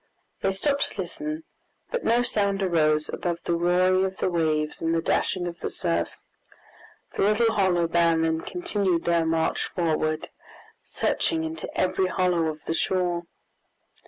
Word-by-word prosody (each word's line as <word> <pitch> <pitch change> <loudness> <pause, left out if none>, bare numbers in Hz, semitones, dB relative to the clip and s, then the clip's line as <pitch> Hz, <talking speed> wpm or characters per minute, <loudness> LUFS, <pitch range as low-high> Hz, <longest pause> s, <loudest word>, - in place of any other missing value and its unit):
They 195 - +2
stopped 280 +9 0
to 200 - -3
listen, 305 - -5 0.5
but - - -2
no 240 +1 +3
sound 200 -4 0
arose 155 -4 +2
above 170 -1 -3
the 170 - 0
roaring 180 +2 +3
of 190 0 -2
the 185 - 0
waves 155 -3 0
and 165 0 +1
the - - +2
dashing 180 +1 0
of 175 0 -5
the - - -3
surf. 85 0 -1 1.1
The - - -1
little 205 -5 +3
band 165 -1 +3
then 160 0 0
continued 200 - -1
their 170 -1 +2
march 160 0 +1
forward, 155 -2 -1 0.5
searching 325 -1 0
into 320 0 -4
every 185 0 +2
hollow 180 -3 +1
of 155 -1 -4
the - - -1
shore. 175 0 0
175 Hz, 150 wpm, -25 LUFS, 165-195 Hz, 1.1 s, no